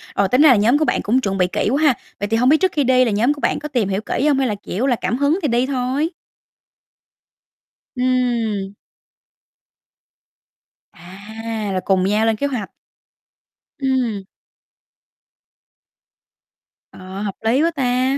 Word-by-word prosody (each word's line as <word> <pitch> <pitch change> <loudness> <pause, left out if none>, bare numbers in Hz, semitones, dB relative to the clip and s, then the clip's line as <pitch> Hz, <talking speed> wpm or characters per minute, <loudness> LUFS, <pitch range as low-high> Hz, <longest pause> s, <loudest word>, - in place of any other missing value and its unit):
rồi 200 - +2
tính 250 +7 +2
ra 310 - +7
là 250 - +7
nhóm 225 +7 +3
của 310 - +1
bạn - - 0
cũng 250 +5 +1
chuẩn 195 -3 -2
bị 180 -1 +2
kỹ 185 - -1
quá 285 +3 +1
ha, 295 -4 +5 0.3
vậy 205 - -2
thì 225 +2 0
hông 250 +2 +3
biết 310 - +5
trước 375 -1 +2
khi 295 - 0
đi 255 0 +4
là 230 - 0
nhóm 235 +8 +2
của 290 - -12
bạn - - 0
có 300 - -6
tìm 240 -9 -1
hiểu 195 +1 -1
kỹ 265 - -2
hông, 285 - +3
hay 265 - +1
là, 210 - -2
kiểu 215 +8 -2
là, 245 - +2
cảm 240 - -2
hứng 285 +6 +1
thì 300 - 0
đi 245 +1 +1
thôi? 270 +4 -1 1.9
Ừm. 235 -6 -1 2.2
À, 210 +4 -7
là 185 - 0
cùng 190 -1 +2
nhau 210 +3 +1
lên 225 - +2
kế 285 +7 -1
hoạch. 245 -8 -4 1.1
Ừm. 250 -7 -1 2.7
Ờ, 185 +1 -9
hợp 200 -2 -4
lý 260 +7 +3
quá 335 - +2
ta, 260 -2 0
245 Hz, 170 wpm, -19 LUFS, 205-270 Hz, 2.7 s, ra